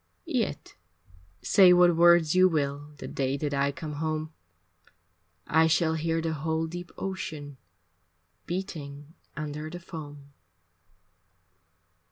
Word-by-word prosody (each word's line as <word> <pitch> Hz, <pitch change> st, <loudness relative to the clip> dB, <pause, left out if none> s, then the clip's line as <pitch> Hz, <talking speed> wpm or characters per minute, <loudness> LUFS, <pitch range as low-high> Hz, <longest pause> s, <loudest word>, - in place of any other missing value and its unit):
Yet -, -, -2 dB, 0.7 s
say 185 Hz, -3 st, +6 dB
what 175 Hz, -1 st, +5 dB
words 170 Hz, -2 st, +5 dB
you 185 Hz, 0 st, +5 dB
will 145 Hz, -1 st, -2 dB
The -, -, -7 dB
day 135 Hz, 0 st, -2 dB
that 145 Hz, 0 st, -3 dB
I 140 Hz, 0 st, +1 dB
come 150 Hz, +1 st, -7 dB
home; 155 Hz, 0 st, -2 dB, 1.1 s
I 160 Hz, +1 st, +4 dB
shall 160 Hz, 0 st, +2 dB
hear 165 Hz, +1 st, -1 dB
the 165 Hz, -1 st, -1 dB
whole 160 Hz, +2 st, -1 dB
deep 175 Hz, +1 st, -7 dB
ocean 155 Hz, -7 st, -5 dB, 0.9 s
Beating 155 Hz, -5 st, -6 dB, 0.2 s
under 150 Hz, 0 st, -5 dB
the 175 Hz, +2 st, -7 dB
foam. 145 Hz, -4 st, -10 dB
160 Hz, 115 wpm, -27 LUFS, 145-170 Hz, 1.1 s, say